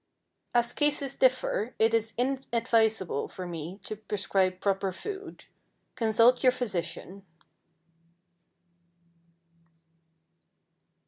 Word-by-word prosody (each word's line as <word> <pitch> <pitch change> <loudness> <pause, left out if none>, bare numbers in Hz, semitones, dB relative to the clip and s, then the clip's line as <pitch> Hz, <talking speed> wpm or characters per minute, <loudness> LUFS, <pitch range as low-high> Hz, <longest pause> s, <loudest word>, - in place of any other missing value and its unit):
As 240 0 +3
cases 290 -2 +1
differ, 255 -3 +1
it 225 +1 +3
is 225 0 0
inadvisable 230 - +1
for 185 - -8
me 170 +2 -6
to 215 - -5
prescribe 195 -3 -1
proper 195 -1 0
food. 400 - -8 0.5
Consult 230 +2 +4
your 255 - +6
physician. 195 -4 -4
220 Hz, 80 wpm, -28 LUFS, 195-250 Hz, 0.5 s, your